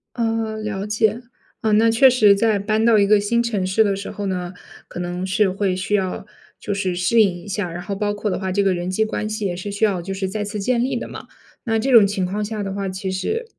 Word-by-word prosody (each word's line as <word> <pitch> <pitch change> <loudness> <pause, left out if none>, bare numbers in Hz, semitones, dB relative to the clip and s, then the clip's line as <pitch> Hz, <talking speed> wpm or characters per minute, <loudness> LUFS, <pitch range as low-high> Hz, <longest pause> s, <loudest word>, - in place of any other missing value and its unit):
呃， 225 -2 -1
了 205 -2 -4
解。 215 +2 +1 0.4
呃， 220 -2 +1
那 225 +2 +5
确 260 +4 +6
实 215 -5 +5
在 215 0 +2
搬 215 +2 0
到 230 -2 +5
一 200 - +4
个 210 0 +5
新 235 +3 +1
城 210 -6 -1
市 220 +4 +3
的 200 -2 0
时 200 - -6
候 205 - -5
呢， 180 -1 -3 0.3
可 - - -11
能 180 +1 -3
是 195 +1 +2
会 195 -1 -1
需 195 +3 -3
要 190 -2 -2 0.3
就 205 - -3
是 190 -3 -2
适 180 +6 +2
应 200 - +5
一 - - -13
下， 195 -3 -2
然 175 +1 -6
后 200 -1 -4
包 205 0 -1
括 205 -1 -3
的 - - -2
话 190 -1 -3
这 200 +1 +1
个 195 -1 +2
人 175 +1 -3
际 215 +4 +1
关 215 -1 -3
系 215 -1 -3
也 175 -2 -1
是 200 +2 -5
需 205 - -3
要 195 -5 +2
就 195 +3 -5
是 190 -1 -3
再 210 +1 -3
次 210 +1 -5
建 240 +3 +1
立 265 - -2
的 - - -4
嘛。 - - -9 0.4
那 225 -1 +1
这 265 +4 0
种 220 -5 +7
情 195 -2 -1
况 205 +3 -2
下 215 -1 -4
的 195 -1 -4
话， 200 -1 -3
其 190 0 -4
实 440 - -2
205 Hz, 285 characters per minute, -21 LUFS, 190-220 Hz, 0.4 s, 种